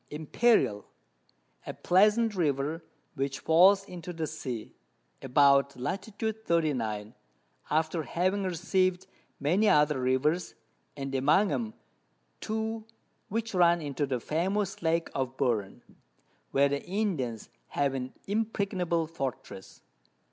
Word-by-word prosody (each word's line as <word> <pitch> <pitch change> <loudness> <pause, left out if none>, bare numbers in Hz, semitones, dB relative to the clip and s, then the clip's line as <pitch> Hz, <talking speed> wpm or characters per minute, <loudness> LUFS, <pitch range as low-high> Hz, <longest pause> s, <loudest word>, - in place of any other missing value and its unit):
Imperial, 150 - +1 0.8
a - - -5
pleasant 210 +4 +3
River, 155 -2 -1 0.3
which 135 -2 -2
falls 190 +5 +5
into 180 -1 -7
the 165 -2 -3
Sea, 130 -7 -6 0.5
about 140 0 +4
Lat. 125 +10 -3
39. 155 - -1 0.6
after 160 +2 +1
having 185 +6 0
receiv'd 185 0 0 0.3
many 180 +10 +3
other 150 -2 +4
Rivers, 150 +7 0 0.4
and 135 -1 -5
among 150 +10 +3
'em 220 -2 -3 0.6
two 220 0 -3 0.5
which 225 +1 -3
run 175 -1 +4
into 145 -2 -2
the 130 -2 -1
famous 190 - -1
Lake 165 0 0
of 130 -1 -3
Buren, 110 -8 -1 0.7
where 140 +1 +3
the 140 0 -2
Indians 170 - -2 0.2
have 140 -1 0
an 130 -1 -4
impregnable 195 -5 -1
Fortress. 135 - -7
160 Hz, 110 wpm, -29 LUFS, 135-190 Hz, 0.8 s, falls